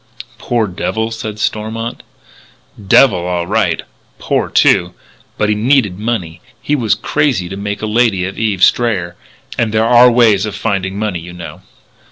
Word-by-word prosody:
"Poor 120 -2 0
devil," 110 +4 -3
said 110 -1 -6
Stormont. 110 +2 -3 0.9
"Devil, 100 -3 +5
all 90 -1 -2
right. - - 0 0.3
Poor, - - -1
too. 90 0 +3 0.4
But 105 - +1
he - - +3
needed 105 -4 +1
money. 95 -7 -3 0.2
He 150 - -1
was 115 -7 +1
crazy 135 -12 0
to 95 - -6
make 105 +1 -5
a - - +1
lady 110 -4 +1
of 95 - -6
Eve 105 -5 0
Strayer. 95 -8 +2 0.4
And 115 -2 +1
there 110 +1 +1
are 120 +1 +6
ways 110 -4 +3
of 105 - -6
finding 95 -3 -2
money, 105 -4 -2
you 85 +1 -10
know." 90 -1 -9
105 Hz, 160 wpm, -15 LUFS, 95-115 Hz, 0.9 s, are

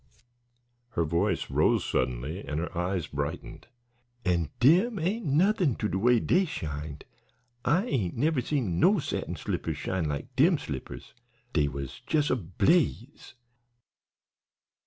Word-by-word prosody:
Her 85 - +3
voice 85 +3 0
rose - - +3
suddenly 65 +8 -1
and 75 +1 -3
her 85 +2 -5
eyes 90 -1 -1
brightened. 70 0 -5 0.6
"And 85 -4 +1
dem 185 - +4
ain't 190 +4 -1
nothin' 175 - +3
to 105 - -1
de 95 - -2
way 120 +3 +4
dey 185 - +2
shined. 75 - -5 0.6
I 180 +8 +2
ain't 110 - -1
never 145 +1 +2
seen 120 - -1
no 200 - +5
satin 155 - -3
slippers - - -3
shine 95 -3 -2
like 75 - -5
dem 165 +5 +5
slippers; 70 - -7 0.4
dey 75 -3 +3
was 70 -2 -6
jes' 150 -2 +2
ablaze!" 125 - 0
105 Hz, 130 wpm, -28 LUFS, -, 0.6 s, no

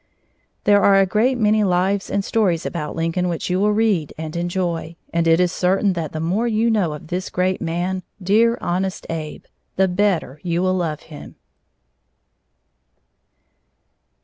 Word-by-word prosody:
There 205 -1 +5
are 200 - +5
a 195 - +5
great 225 +7 +1
many 215 -1 +3
lives 190 +1 +1
and 200 0 -1
stories 185 -7 +1
about 150 -3 -4
Lincoln 165 +2 -1
which 170 +1 -3
you 180 - +1
will 210 +1 +3
read 210 -8 +1
and 155 0 -6
enjoy, 170 -1 -2 0.2
and 170 0 +1
it 165 +1 +4
is 180 -1 +2
certain 190 +2 +1
that 165 -4 -4
the 155 - -5
more 185 +9 0
you 230 +1 +2
know 190 -8 +1
of 150 +1 -10
this 185 +1 -3
great 185 +1 -1
man, 175 +3 -2 0.2
Dear 220 +5 +3
"Honest 185 +2 -2
Abe," 155 -2 -5 0.3
the 190 0 +3
better 180 -7 0
you 175 0 -1
will 185 0 +2
love 165 -5 -2
him. 150 -2 -12
180 Hz, 160 wpm, -21 LUFS, 165-200 Hz, 0.3 s, There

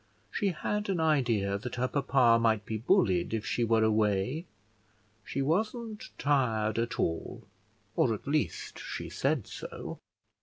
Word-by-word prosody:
She 205 - 0
had 205 +4 -2
an 185 -3 +1
idea 120 -11 +2
that 125 +3 -5
her 125 +1 0
papa 130 -4 +4
might 110 -3 +2
be 110 - -3
bullied 95 -3 +2
if 110 - -3
she 120 - 0
were 115 -1 +3
away: 110 - +1 0.8
she 135 - -2
wasn't 215 - -1
tired 115 -6 +1
at 115 0 -2
all, 80 -1 -2 0.5
or 120 - +3
at - - -11
least 150 +1 -1
she - - -6
said 135 -4 0
so. - - -7
125 Hz, 145 wpm, -30 LUFS, 110-155 Hz, 0.8 s, papa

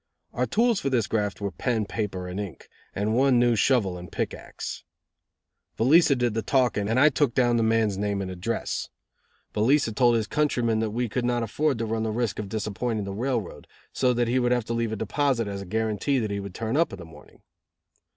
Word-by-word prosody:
Our 125 +1 0
tools 230 - +2
for 135 - -1
this 120 -5 +1
graft 105 -3 -2
were 100 -1 -2
pen, 115 +2 -1
paper, 95 -4 -4
and 90 +2 -5
ink; 100 -5 -7 0.3
and 105 +3 0
one 130 0 +4
new 120 -1 +4
shovel 105 -7 +2
and 90 - -10
pick - - -2
axe. - - -7 0.9
Velica 140 +4 +5
did 120 -2 0
the 115 - -1
talking 110 -4 +1
and 115 +3 +2
I 150 +3 +7
took 145 -5 0
down 120 -2 +3
the - - +2
man's 110 -3 +1
name 100 -1 -1
and 95 -1 -4
address. 95 +6 -3 0.6
Velica 115 +2 +2
told 120 +1 +4
his 110 -2 +1
countryman 120 -4 +1
that 110 -1 0
we 120 +3 -1
could 120 +3 -2
not 120 -1 0
afford 140 +5 0
to 115 - -2
run 110 0 -2
the 110 - -1
risk 115 -1 -1
of 105 -2 -5
disappointing 110 +1 -2
the 100 0 -5
railroad, 115 -3 -3 0.3
so 125 -1 +2
that 120 -1 +1
he 125 +2 +2
would 120 -1 +1
have 120 -3 +1
to 115 - -3
leave 115 -1 -1
a - - -2
deposit 115 +2 0
as 100 -1 -4
a 100 - -8
guarantee 110 +6 0
that 110 -4 -1
he 100 - -2
would 100 -2 -7
turn 115 +2 -2
up 165 +3 +2
in 100 - -7
the 90 - -9
morning. 80 - -17
115 Hz, 220 wpm, -26 LUFS, 105-125 Hz, 0.9 s, I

